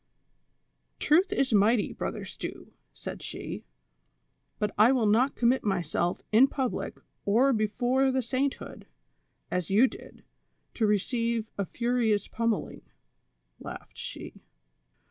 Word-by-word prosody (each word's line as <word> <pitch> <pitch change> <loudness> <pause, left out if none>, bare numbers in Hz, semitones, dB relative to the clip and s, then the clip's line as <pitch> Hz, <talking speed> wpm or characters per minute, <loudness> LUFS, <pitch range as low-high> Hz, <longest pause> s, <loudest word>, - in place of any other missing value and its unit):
"Truth 360 +6 +3
is 275 - +1
mighty. 210 +1 +3
Brother - - -4
Stew," - - -8 0.2
said - - -8
she, - - -6 0.9
"but 210 -1 -1
I 215 +4 +6
will 250 -4 +2
not 235 +6 +3
commit 245 +2 +2
myself 175 -3 -1
in 235 +5 +7
public 265 -2 -3 0.3
or 245 +7 +4
before 245 +5 +1
the 260 0 0
sainthood, 265 +3 -3 0.6
as 180 -3 -1
you 210 +6 +6
did, - - -8 0.5
to 220 - +1
receive 230 +2 0
a 200 - -2
furious 235 -1 0
pummeling," 230 -2 -2 0.8
laughed - - -9
she. - - -8
230 Hz, 115 wpm, -28 LUFS, 210-260 Hz, 0.9 s, in